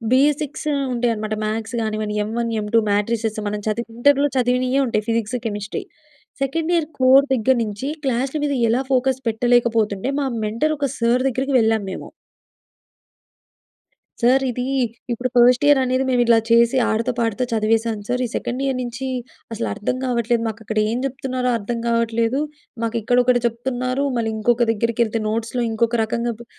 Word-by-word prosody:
Basics 295 +2 +1 0.3
ఉంటాయన్నమాట. 225 -3 -1
Maths 220 +2 -3
కానివ్వండి, 215 -1 -2
ఎమ్‌ 215 +2 -5
1, 230 -1 -1
ఎమ్‌ 210 - -5
2, 230 - +6
matrices 220 +1 0
మనం 210 0 -3
చదివి 230 +2 -2
ఇంటర్‍‌లో 285 +3 +4
చదివినయే 255 +2 +2
ఉంటయి. 220 -3 -1
Physics, 230 +1 0
chemistry. 210 - -4 0.6
Second 315 +5 -1
year 320 -3 0
core 260 +2 +6
దగ్గర 260 +2 +2
నుంచి 215 +5 -5 0.2
క్లాస్‌ల 265 +3 0
మీద 285 - 0 0.2
ఎలా 245 +4 +2
ఫోకస్ 260 0 +1
పెట్టలేకపోతుండే, 230 -1 +1
మా 280 - 0 0.2
మెంటర్ 230 +9 0
ఒక 280 -1 0
సార్ 235 +2 +2
దగ్గరికి 265 +2 -1
వెళ్ళాము 220 -3 +1
మేము. - - -7 2.1
సార్ 255 +3 +4
ఇది 245 +1 -3 0.5
ఇప్పుడు 245 +2 -2
ఫస్ట్ 245 +3 +5
ఇయర్‌ 290 -1 +6
అనేది 255 +1 +1
మేము 245 -1 +3
ఇలా 230 -1 +5
చేసి 235 +2 +5
ఆడతా, 225 +3 0
పాడతా 230 +1 0
చదివేసాను 225 -1 0
సార్. 250 +1 0
ఈ - - -6
సెకండ్ 250 +2 -3
ఇయర్‍ 270 -1 0
నుంచి 250 +2 -5 0.5
అసలు 225 +1 -3
అర్థం 230 +5 -2
కావట్లేదు. 240 -1 +1
మాకు 220 0 -6
అక్కడ 220 +1 -2
ఏం 235 - -1
చెప్తున్నారో 255 -1 -3
అర్థం 230 +2 -3
కావట్లేదు. 230 +1 +1 0.4
మాకు 230 0 -1
ఇక్కడొకటి 245 +2 +3
చెప్తున్నారు, 255 +3 -2
మళ్ళీ 225 -1 0
ఇంకొకి 240 +2 +2
దగ్గరికి 230 +1 0
ఏళ్తే 225 0 -2
నోట్స్‌‌లో 230 +3 -2
ఇంకొక 230 +1 +1
రకంగా 235 +2 -2
బు 235 - -11
235 Hz, 160 wpm, -21 LUFS, 225-255 Hz, 2.1 s, 2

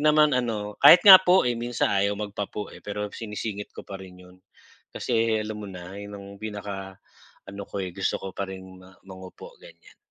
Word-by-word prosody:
naman 150 0 +4
ano 110 -5 -2
kahit 180 - +8
nga 190 -2 +11
po 185 0 +4
eh, 125 - +1
minsan 120 0 -1
ayaw 100 +1 +1
magpa 105 -1 -5
po 105 -1 -7
eh, - - -13
pero 105 0 -5
sinisingit 105 -1 -6
ko - - -9
pa 95 -1 -9
rin 95 -1 -12
yun, 90 0 -17 0.6
kasi 115 -2 0
alam 105 0 -6
mo 105 - -8
na 90 -1 -10
ayon 100 0 -9
ang 100 0 -11
pinaka 100 -3 -7 0.5
ano 100 +1 -8
ko 100 - -5
eh, 90 - -7
gusto 95 +2 -1
ko 95 - -7
pa 100 +1 -5
rin 95 -1 -8 0.2
ma 95 0 -18
mangopo 95 - -12
ganyan. - - -18
105 Hz, 200 wpm, -25 LUFS, 95-115 Hz, 0.6 s, nga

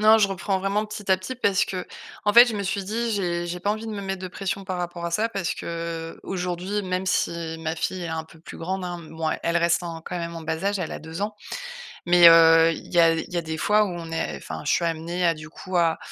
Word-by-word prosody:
Non, 215 +1 +7
je 200 -2 +4
reprends 190 0 -1
vraiment 200 +2 0
petit 210 -2 -6
à 190 - +6
petit 185 +8 -6
parce 200 -6 +2
que, 185 -1 -4 0.4
en 210 - +3
fait, 240 +3 +10
je 235 - -2
me 200 - -2
suis 195 +1 -2
dit, 230 +4 -2
j'ai 175 -4 -1
j'ai 180 +1 -3
pas 200 +3 0
envie 220 +2 -3
de 220 - -4
me 205 - -4
mettre 195 -1 -4
de 185 - -4
pression 195 +1 -4
par 185 -1 -3
rapport 175 -1 -4
à 170 - -2
ça 215 +7 +1
parce 190 -5 -2
que, 165 -1 -5
aujourd'hui, 180 +2 -3
même 185 0 -2
si 170 -3 -1
ma 160 0 -2
fille 180 +2 -3
est 170 - -4
un 160 0 -3
peu 160 +1 -17
plus 165 - -11
grande, 185 +2 -3
hein, 175 -1 -4
mouais, 160 -1 -3
elle 170 0 +1
reste 170 +1 +2
en 165 -1 -5
quand 180 +2 -6
même 170 0 -5
en 165 - -7
bas 160 +2 -3
âge, 200 0 +1
elle 175 - -3
a - - -6
2 160 +3 -7
ans. 210 +1 -2 0.7
Mais, 175 -1 +8
heu, 165 0 +7
il 165 - -10
y 175 - +4
a 165 -1 +6
il 165 - -5
y - - 0
a - - +1
des 160 -1 -4
fois 210 +5 +3
où - - -3
on 170 -2 -6
est, 165 - -2
enfin, - - -7
je - - +2
suis 170 - +2
amenée 170 +2 -1
à 170 - +4
du 155 0 -10
coup 185 +3 -8
à 165 -1 +3
175 Hz, 280 wpm, -24 LUFS, 165-195 Hz, 0.7 s, fait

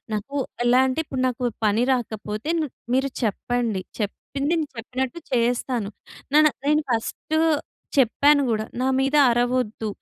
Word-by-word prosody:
నాకు 215 +7 -4 0.3
ఎలా 245 +1 +5
అంటే 260 +4 -1
ఇప్పుడు 265 -3 -4
నాకు 250 0 -3 0.2
పని 215 +3 +2
రాకపోతే 220 +1 -3
న - - +1 0.3
మీరు 265 +1 +2
చెప్పండి. 230 -1 -1 0.2
చెప్పింది 275 +7 -3
నేను 320 -2 0
చెప్పినట్టు 255 +5 -3
చేస్తాను. 240 -2 0 0.5
నాన్న 305 0 +7 0.2
నేను 300 +1 +3
ఫస్టు 235 +7 -2 0.6
చెప్పాను 280 +3 +4
గూడా 215 -2 0 0.2
నా 260 - +1
మీద 270 +2 +2
అరవొద్దు, 240 -2 0
245 Hz, 130 wpm, -23 LUFS, 225-275 Hz, 0.6 s, నాన్న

